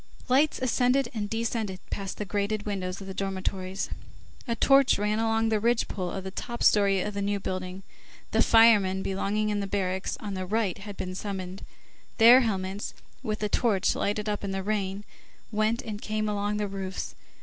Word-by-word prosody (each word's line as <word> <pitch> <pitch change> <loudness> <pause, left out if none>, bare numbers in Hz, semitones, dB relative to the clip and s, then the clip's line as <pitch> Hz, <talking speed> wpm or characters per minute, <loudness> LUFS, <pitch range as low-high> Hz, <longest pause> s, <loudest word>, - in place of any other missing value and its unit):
Lights 280 +4 +4
ascended 255 0 +2
and 210 -3 -3
descended 225 -4 -2
past 195 -2 -4
the 210 - -3
grated 205 +2 -1
windows 190 -2 -3
of - - -7
the 190 - -6
dormitories, 190 0 -3 0.6
a 235 - 0
torch 275 +2 +5
ran 210 +1 0
along 225 0 +2
the 215 -1 +2
ridge 235 +2 +2
pole 185 -3 -3
of 190 +2 -5
the 190 - -5
top 235 +4 -5
story 200 -2 +4
of 210 - -3
the 200 - -3
New 200 0 0
Building, 185 0 -5 0.5
the - - +3
firemen 205 -5 +5
belonging 205 +2 -1
in 205 -1 0
the 200 - -2
barracks 190 -1 -1
on 205 -2 -5
the 185 -1 -4
right 210 -2 0
had 205 0 -8
been 185 0 -4
summoned. 190 -1 -5 0.5
Their 240 +3 +9
helmets, 195 -3 -2 0.3
which 215 -1 -2
the 210 - -1
torch 205 -4 +2
lighted 210 +1 -1
up 205 -1 -2
in 200 - -2
the 195 0 -2
rain, 200 -1 -2 0.5
went 215 +3 +1
and 210 -1 -6
came 215 0 -1
along 205 0 -1
the 210 -1 -1
roofs. 195 -1 -5
205 Hz, 185 wpm, -27 LUFS, 190-220 Hz, 0.6 s, Their